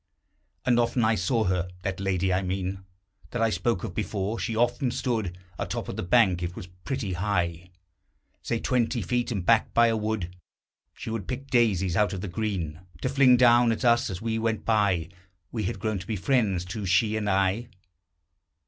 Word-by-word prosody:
And 120 -1 +3
often 120 0 +1
I 110 - +3
saw 110 +4 +1
her: 90 -1 0
that 95 -1 -3
lady, 95 -1 0
I 95 - +1
mean, 95 +1 -3 0.5
That 125 - -3
I 115 - +2
spoke 115 -5 0
of - - -4
before. 105 +1 -2
She 115 - -2
often 120 +3 +1
stood 110 -8 -2 0.2
Atop - - -3
of - - -4
the - - -3
bank; 95 -2 +3
it 90 0 -4
was - - -7
pretty 95 +4 -5
high, 90 -2 -1 0.7
Say, 115 - -2
twenty 120 -2 0
feet, 120 +6 -1
and 100 -6 -2
backed 115 +2 +3
by 115 0 +6
a 115 - +1
wood. 105 -5 -3 0.6
She - - -6
would 110 -5 -4
pick 135 +2 -5
daisies 95 -8 +2
out 105 -1 +2
of 95 - -4
the 105 - -4
green 90 -5 -3 0.2
To 130 - +1
fling 130 -2 +5
down 120 -1 +5
at 115 +3 -2
us 120 0 +4
as 95 +2 -6
we 115 -1 -1
went 115 -1 -1
by. 100 -7 +2 0.4
We 110 -4 -2
had - - -2
grown 110 -3 -1
to 90 - -10
be 110 - -2
friends, 100 -4 +1
too, 100 +2 -5
she 105 +4 +3
and 105 -1 -1
I. 100 +4 +1
105 Hz, 195 wpm, -26 LUFS, 95-115 Hz, 0.7 s, by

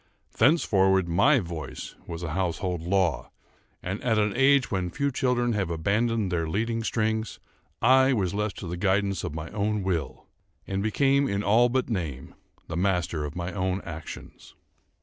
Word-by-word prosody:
Thenceforward 95 - +3
my 100 - +4
voice 80 - -6
was 85 +1 -6
a 80 - -3
household 90 -1 -2
law; 90 -2 0 0.5
and 95 +3 -4
at 115 -3 +2
an 105 -1 +1
age 135 0 +4
when 95 -3 -1
few 140 +10 -1
children 125 -2 +1
have 100 -5 -1
abandoned 100 +5 0
their 85 -2 -1
leading 115 +5 -1
strings, 110 -1 -1 0.4
I 130 +2 +6
was 100 -8 0
left 105 0 -2
to 95 - -6
the 90 +1 -4
guidance 100 +1 0
of 75 - -4
my 80 +2 -6
own 105 0 -1
will, 80 -9 -3 0.4
and 95 0 -2
became, 135 +6 +2
in 100 +1 -1
all 115 +4 +4
but 130 +1 0
name, 80 - -4 0.3
the - - -5
master 90 -4 0
of 75 - -7
my 90 +1 -4
own 95 -1 -1
actions. 80 -2 -9
100 Hz, 165 wpm, -26 LUFS, 85-115 Hz, 0.5 s, I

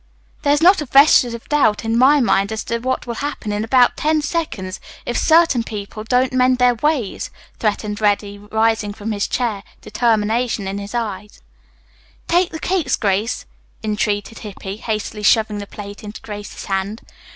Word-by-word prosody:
"There 285 - +2
is 295 +2 +2
not 370 0 +6
a 300 - -5
vestige 265 -3 +5
of 230 - -11
doubt 275 -8 +2
in 225 0 0
my 270 +5 +5
mind 200 -4 +2
as 220 - -3
to 235 - -2
what 260 +2 -2
will 240 - -4
happen 285 -7 -4
in 205 +1 -1
about 245 +2 +4
ten 310 0 +1
seconds 275 - -3 0.3
if 240 - -3
certain 320 -7 +4
people 215 -1 -7
don't 250 +3 +1
mend 255 0 +3
their 250 0 +4
ways," 255 -4 -1 0.3
threatened 210 -1 -2
Reddy, 205 -1 0
rising 220 0 0
from 215 +1 -5
his 205 -1 -1
chair, 230 -5 -1 0.2
determination 220 0 0
in 195 +1 -3
his 200 +3 -7
eye. 210 -3 -3 1.0
"Take 350 +1 +3
the 320 - -6
cakes, 345 -9 0
Grace," 205 +2 -1 0.4
entreated 210 0 -2
Hippy, 200 -2 -7
hastily 215 -1 -4
shoving 215 0 +3
the 200 - -7
plate 205 0 -9
into 210 0 -8
Grace's 205 -1 -8
hand. 195 +2 -3
220 Hz, 170 wpm, -19 LUFS, 205-255 Hz, 1.0 s, not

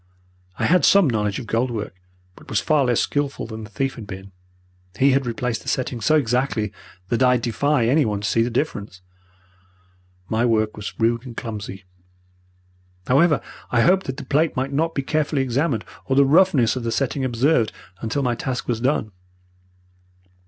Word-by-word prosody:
I - - 0
had 180 +2 +4
some 200 -4 +6
knowledge 105 -4 0
of 125 - -6
gold 115 +3 0
work, 110 -6 -4 0.4
but - - -16
was 110 - +1
far 145 +3 +2
less 120 -2 +2
skilful 145 -1 -2
than 110 -1 -7
the 105 - -10
thief 135 +4 -2
had 110 -4 -10
been. 95 0 -9 0.7
He 135 +1 +4
had 135 -1 +1
replaced 120 0 -2
the - - -16
setting 125 -2 -2
so 155 - +3
exactly 125 -6 0 0.4
that 120 - 0
I 125 -1 +5
defy 120 +3 +1
anyone 115 -6 +2
to 105 - -2
see 115 - +2
the 115 - +1
difference. 105 -7 -3 1.2
My 110 +3 0
work 110 -3 +1
was 105 -1 -7
rude 115 +1 +1
and 120 - -10
clumsy. 105 -5 -6 1.2
However, 150 +3 +3 0.3
I 120 - +2
hoped 190 +6 +3
that 130 0 -4
the 145 - -7
plate 150 +5 +1
might 135 +2 -2
not 165 +3 0
be 140 - -1
carefully 150 -1 0
examined, 130 -2 -1 0.2
or 130 - +1
the 140 0 +6
roughness 145 -6 +4
of 130 - -3
the 115 0 -2
setting 135 +1 -1
observed, 125 - +2 0.3
until 115 +6 -2
my 125 -2 +1
task 125 +1 -4
was 115 -2 -1
done. 125 -5 0
125 Hz, 180 wpm, -22 LUFS, 110-140 Hz, 1.2 s, some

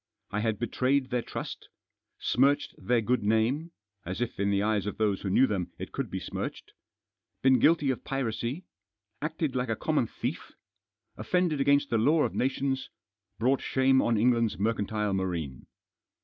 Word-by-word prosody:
I 105 - -1
had 110 -1 0
betrayed 130 +4 0
their 125 -1 +1
trust; - - -7 0.5
smirched 140 +3 +2
their 120 -1 +1
good 125 +3 +1
name 110 +10 +1 0.2
— 100 -1 -54
as 90 +4 -5
if 120 -4 -3
in 100 0 +1
the 100 0 +2
eyes 105 -1 0
of 105 - -4
those 105 -3 +1
who 100 - -3
knew 125 +8 +5
them 90 -7 -2
it - - -7
could - - -3
be - - -3
smirched; - - -5 0.7
been 130 -1 +5
guilty 155 -4 +4
of 130 - -5
piracy; 135 - -3 0.6
acted 155 -2 -2
like 125 -1 -1
a 110 - +1
common - - 0
thief; - - -5 0.6
offended 175 -5 +1
against 140 +1 +3
the 115 - +3
law 150 +7 +4
of - - -1
nations; 135 0 -1 0.5
brought 130 +4 +2
shame 130 0 +3
on 115 -1 +2
England's 115 0 +2
mercantile 105 -1 0
marine. 85 -8 -3
120 Hz, 165 wpm, -28 LUFS, 105-135 Hz, 0.7 s, knew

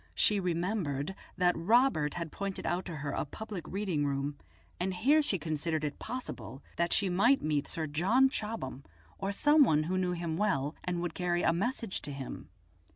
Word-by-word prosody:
She 210 -1 +4
remembered 175 -4 -1 0.2
that 180 -1 +3
Robert 180 - +3
had 170 -3 -4
pointed 200 -1 -4
out 180 +1 -1
to 170 - -5
her 145 -1 -3
a - - -1
public 200 +2 -7
reading 190 -7 -1
room, 140 0 -1 0.4
and 185 +1 -1
here 280 +12 +4
she 215 -9 0
considered 155 0 -2
it 145 -1 -3
possible 235 - -6
that 170 0 0
she 200 - +3
might 215 +10 +4
meet 150 -2 0
Sir 160 - -2
John 190 - +3
Chobham, 210 - -4 0.4
or 195 +1 -1
some 295 +8 +5
one 155 - +3
who 185 +4 0
knew 180 -1 0
him 170 -2 -3
well 160 -8 +1
and 175 -1 -2
would 175 - -2
carry 175 -1 0
a 165 - +4
message 225 +2 -1
to 145 - -4
him. 135 -2 -7
175 Hz, 185 wpm, -31 LUFS, 155-205 Hz, 0.4 s, some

